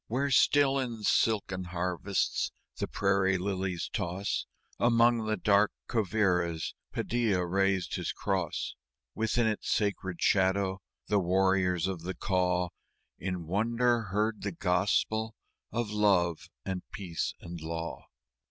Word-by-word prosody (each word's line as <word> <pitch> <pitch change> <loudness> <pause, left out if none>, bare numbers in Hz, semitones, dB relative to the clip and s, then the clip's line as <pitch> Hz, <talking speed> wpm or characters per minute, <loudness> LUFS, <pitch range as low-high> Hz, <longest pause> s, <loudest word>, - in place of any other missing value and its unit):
Where 135 +5 0
still 140 +1 +4
in 120 -4 -4
silken 100 -5 +1
harvests 90 +2 -1 0.3
the - - -2
prairie 95 -1 +2
lilies 95 -2 -2
toss, 90 +3 -2 0.3
Among 115 -1 +4
the 110 0 0
dark 100 +2 +4 0.2
Quivíras 90 -6 +1 0.2
Padilla 110 -7 0
reared 95 +1 +2
his - - -2
cross. 95 -6 -2 0.4
Within 110 +2 +1
its 110 -1 -1
sacred 95 -4 -1
shadow 95 0 +2 0.2
the 105 -1 +2
warriors 95 -1 +2
of 95 -3 -3
the 95 +3 -4
Kaw 90 -2 +1 0.5
In 90 -1 -3
wonder 115 +6 +2
heard 105 +3 -1
the 100 - -2
Gospel 105 +6 +1 0.4
of 115 -1 -2
Love 95 -6 +2 0.2
and 95 -1 -2
Peace 90 -5 -3
and 85 -1 -8
Law. 80 +1 -5
95 Hz, 120 wpm, -30 LUFS, 90-110 Hz, 0.5 s, still